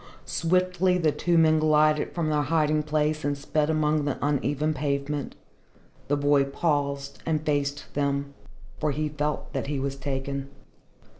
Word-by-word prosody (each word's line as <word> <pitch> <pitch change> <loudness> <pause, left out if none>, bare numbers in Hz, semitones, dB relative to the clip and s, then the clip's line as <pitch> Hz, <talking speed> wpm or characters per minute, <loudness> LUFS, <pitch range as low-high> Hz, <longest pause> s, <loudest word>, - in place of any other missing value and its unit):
Swiftly 180 +1 +1
the 160 -4 +2
two 170 +3 +1
men 160 -1 +5
glided 155 -1 +3
from 160 -3 -1
their 150 -1 +2
hiding 155 0 +2
place 155 0 0
and 145 0 0
sped 150 +2 0
along 155 -1 +2
the 145 - -1
uneven 145 +1 0
pavement. 140 0 -2 0.7
The 145 - +1
boy 145 -1 +3
paused 140 -1 -1
and 155 -1 -1
faced 145 -1 -1
them, 140 0 -1 0.5
for 155 - +1
he 150 +2 -1
felt 150 0 -3
that 135 0 -2
he 145 -1 -2
was 135 0 -2
taken. 135 0 -4
150 Hz, 150 wpm, -26 LUFS, 140-155 Hz, 0.7 s, men